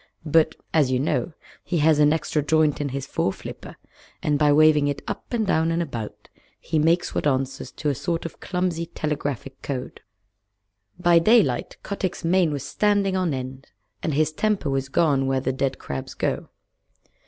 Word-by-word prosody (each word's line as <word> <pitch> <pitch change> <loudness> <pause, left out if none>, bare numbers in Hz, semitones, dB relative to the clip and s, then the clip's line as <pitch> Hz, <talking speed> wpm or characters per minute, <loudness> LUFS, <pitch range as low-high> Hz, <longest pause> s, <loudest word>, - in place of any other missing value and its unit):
But, 160 0 +3 0.2
as 150 -5 +4
you 130 -1 +1
know, 155 +4 -1 0.3
he 175 - -1
has 155 -1 +4
an 150 0 +5
extra 155 -1 0
joint 155 0 +2
in 145 - -1
his 135 0 -4
foreflipper, 95 -7 -4 0.5
and 150 -1 +1
by 150 -1 +4
waving 150 -1 +5
it 145 -1 -3
up - - -6
and 230 -3 0
down 160 -3 +2
and 165 - 0
about 120 -10 -5 0.3
he 160 -2 -1
makes 165 +3 +2
what - - 0
answers 130 -1 -1
to 150 - -2
a - - +1
sort 170 +5 -3
of 165 - -7
clumsy 180 -2 -2
telegraphic 140 -4 -4
code. 130 -3 -5 1.0
By 175 -1 +5
daylight 165 - +3
Kotick's 190 -3 -3
mane 175 -1 +3
was 145 -3 -3
standing 205 -2 +1
on 185 -3 +1
end 130 0 -5 0.3
and 155 - -1
his 155 +1 +2
temper 195 -3 0
was 135 0 -1
gone 140 -3 +2
where 135 0 +1
the 130 0 -1
dead 135 0 -1
crabs 65 -1 -6
go. - - -2
150 Hz, 175 wpm, -24 LUFS, 135-170 Hz, 1.0 s, an